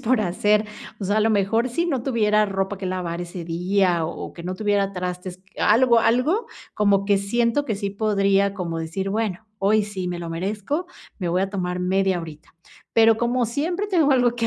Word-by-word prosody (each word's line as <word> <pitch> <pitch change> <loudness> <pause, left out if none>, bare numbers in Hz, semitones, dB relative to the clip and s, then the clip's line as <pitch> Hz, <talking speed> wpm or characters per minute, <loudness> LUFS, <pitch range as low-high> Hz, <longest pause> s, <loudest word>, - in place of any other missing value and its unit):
por 245 0 +2
hacer, 210 +3 +1 0.3
o - - -3
sea, 205 +3 +1
a - - +3
lo 220 +1 +3
mejor, 220 +4 +1
si 335 +8 -1
no 270 -7 -1
tuviera 215 -4 +2
ropa 195 0 -2
que 190 - -4
lavar 180 -2 -3
ese 175 0 -6
día, 175 0 +1
o - - -6
que 170 - -10
no 180 +1 -4
tuviera 200 0 0
trastes, 180 0 -5 0.2
algo 235 +2 +4
algo, 255 - +2 0.3
como 200 -2 +2
que 200 -1 +3
siento 235 +7 +1
que 220 -6 -2
sí 200 0 -3
podría 200 -1 +1
como 170 -4 -3
decir, 165 +4 -3
bueno, 215 -1 -2
hoy 210 +1 +3
sí 190 -3 -4
me 175 -1 -4
lo 170 - -6
merezco, 210 - -3 0.3
me 180 - -2
voy 180 +3 +1
a 195 - -2
tomar 180 -2 -2
media 190 0 +1
horita. 155 -2 -11 0.4
Pero 225 -1 +6
como 240 +1 0
siempre 335 - -2
tengo 335 -7 +2
algo 245 -2 +3
que 230 -1 -1
200 Hz, 200 wpm, -23 LUFS, 185-230 Hz, 0.4 s, Pero